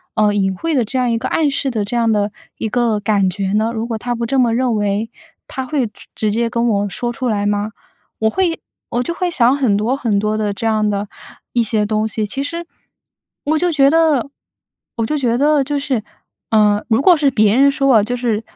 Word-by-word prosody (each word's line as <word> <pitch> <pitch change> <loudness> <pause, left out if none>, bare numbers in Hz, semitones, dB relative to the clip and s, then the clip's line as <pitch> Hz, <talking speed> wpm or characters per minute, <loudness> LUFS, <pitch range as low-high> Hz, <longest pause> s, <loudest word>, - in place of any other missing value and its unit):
呃， 210 -1 +3
隐 195 -2 0
晦 330 - -2
的 255 - +3
这 240 +5 -4
样 250 - +1
一 230 - +1
个 230 - -3
暗 305 -3 +2
示 275 0 -1
的 220 -3 -1
这 215 - -4
样 230 -1 +2
的 205 -1 +1 0.3
一 220 - -3
个 230 -2 +1
感 200 -2 +2
觉 190 +1 -3
呢？ 220 +2 +1
如 225 0 -3
果 225 - -3
他 240 +2 -3
不 235 0 -2
这 265 +3 0
么 240 -2 +3
认 250 -2 +1
为， 205 +1 -1 0.4
他 265 -2 -5
会 255 -3 -1
直 210 - -17
直 215 -1 0
接 230 +2 0
跟 235 +1 0
我 205 -1 0
说 240 +4 -3
出 255 +1 -3
来 205 -2 0
吗？ 205 +1 -1 0.5
我 220 - +2
会 340 +5 -1 0.3
我 240 +1 -1
就 340 - -3
会 360 +1 -1
想 255 -5 +3
很 250 -8 +2
多 225 +5 0
很 230 -7 0
多 215 +1 -1
的 210 -1 -1
这 200 +3 -5
样 215 -1 +1
的 205 0 -2 0.5
一 240 - +3
些 215 -1 0
东 215 +1 0
西。 215 0 -2
其 210 +7 -4
实， 335 +3 -5 0.8
我 310 +2 +2
就 350 +2 +1
觉 275 -2 +5
得 305 -4 +2 0.7
我 230 - 0
就 300 - -1
觉 240 -4 +1
得 295 +1 +3
就 290 +2 -2
是， 275 -5 -1 0.5
呃， 210 -1 +3
如 225 +3 +3
果 355 +4 +6
是 290 -2 +3
别 215 -3 +3
人 275 +2 +5
说 275 0 0
我， 225 -5 +6
就 245 +4 -2
是， 235 -3 -1
230 Hz, 250 characters per minute, -18 LUFS, 210-270 Hz, 0.8 s, 果